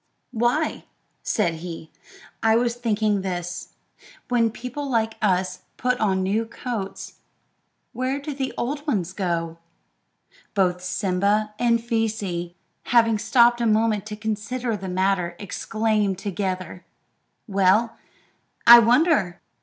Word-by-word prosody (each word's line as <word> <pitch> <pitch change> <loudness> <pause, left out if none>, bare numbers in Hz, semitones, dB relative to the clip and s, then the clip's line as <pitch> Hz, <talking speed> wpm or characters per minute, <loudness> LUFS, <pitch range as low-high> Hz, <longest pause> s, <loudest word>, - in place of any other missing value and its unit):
"Why," 245 +7 0 0.4
said 170 -7 0
he, 165 -1 -8 0.5
"I 225 0 +4
was 235 0 +2
thinking 215 -4 0
this: 175 -1 -5 0.5
When 235 -2 +3
people 250 +5 -6
like 225 -3 +1
us 185 -3 +1 0.2
put 250 +1 0
on 190 -3 +1
new 205 +4 +1
coats, 225 -4 -6 0.7
where 255 +3 -2
do 290 +1 -5
the 270 -1 -3
old 290 +5 -3
ones 185 - -1
go 170 -4 -2 0.7
to?" - - -40 0.2
Both 180 -2 +1
Simba 200 +3 0
and 235 -1 +3
Feesee, 215 -7 -2 0.3
having 230 -2 +3
stopped 235 +2 +4
a 235 - +2
moment 215 -1 +1
to 210 - -5
consider 220 +3 -3
the 190 -2 -6
matter, 180 -2 0
exclaimed 210 -1 -1
together, 185 -2 -4 0.6
"Well, 200 +3 +2 0.7
I 235 0 +11
wonder!" 235 - +3
215 Hz, 120 wpm, -23 LUFS, 185-235 Hz, 0.7 s, I